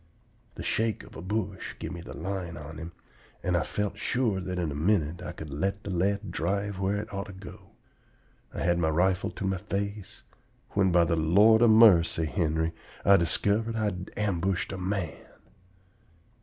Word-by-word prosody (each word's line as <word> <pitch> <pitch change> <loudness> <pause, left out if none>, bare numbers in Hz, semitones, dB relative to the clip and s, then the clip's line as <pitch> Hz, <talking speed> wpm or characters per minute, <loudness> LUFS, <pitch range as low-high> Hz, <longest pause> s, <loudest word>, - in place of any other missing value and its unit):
The - - -6
shake 110 -1 0
of - - -14
a - - -7
bush 100 0 -3
give - - -6
me 85 -2 -6
the - - -9
line 90 -1 -4
on 75 +1 -8
him, 85 +1 -7 0.5
and 90 -1 +1
I 85 - +3
felt 105 0 -3
sure 110 -5 0
that 90 0 -4
in 85 -4 -1
a - - -5
minute 85 0 +1
I 90 - -5
could 80 -4 -9
let 95 +8 -2
the 100 - -5
lead 100 +2 0
drive 100 +3 -2
where 100 +1 0
it 105 +1 -6
ought 100 0 -4
to 100 - -9
go. 95 -1 -12 0.8
I - - -5
had 85 0 +2
my 80 -2 +2
rifle 90 +4 +1
to - - -6
my 95 0 0
face, 100 +1 -5 0.5
when 95 -2 +2
by 85 0 +5
the 85 - +1
Lord 100 +8 +5
of 120 - +6
marcy, 95 -7 +6
Henry, 80 -1 0 0.3
I 100 0 +7
diskivered 105 +6 +1
I 110 - -1
had 90 -3 -3
ambushed 95 -3 0
a 95 - -4
man! 90 -5 -2
95 Hz, 185 wpm, -28 LUFS, 85-100 Hz, 0.8 s, I